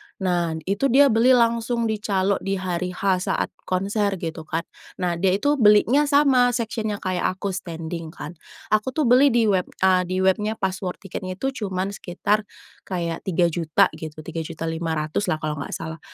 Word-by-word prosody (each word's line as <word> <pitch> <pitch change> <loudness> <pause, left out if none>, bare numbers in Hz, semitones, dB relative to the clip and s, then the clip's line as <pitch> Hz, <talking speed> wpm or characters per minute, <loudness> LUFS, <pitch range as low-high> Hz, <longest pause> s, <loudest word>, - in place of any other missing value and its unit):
Nah, 175 -4 -1
itu 200 - 0
dia 275 +1 +5
beli 245 +3 +5
langsung 235 0 +1
di 215 - -2
calo, 195 -1 0
di 195 0 -2
hari 180 -1 -3
H 185 -1 0
saat - - -1 0.2
konser, 200 +2 0
gitu 160 -3 -6
kan. 165 +1 -2 0.3
Nah, 175 -2 -2
dia 190 0 +3
itu 285 +6 +1
belinya 230 +7 +5
sama 265 -4 +4
section-nya 220 -3 -3
kayak 185 0 -1
aku, 195 +1 -3
standing 165 -2 -6
kan. 150 - -7 0.4
Aku 215 +4 +1
tuh 310 - +2
beli 255 +3 +6
di 240 -3 +3
web, 190 -4 +2 0.2
a 185 -1 +4
di 185 +1 -1
webnya 210 +3 +1
pas 190 -3 -1
war 180 -2 -4
tiketnya 185 -1 -6
itu 270 +7 -2
cuman 190 0 -2
sekitar 200 +3 -1 0.4
kayak 170 -2 -3
Rp3.000.000 170 -3 +2
gitu, 155 -1 -8
Rp3.500.000 160 +1 -3
lah - - +1
kalau 155 -1 -4
nggak - - -5
salah. 160 0 -6
190 Hz, 170 wpm, -23 LUFS, 170-220 Hz, 0.4 s, beli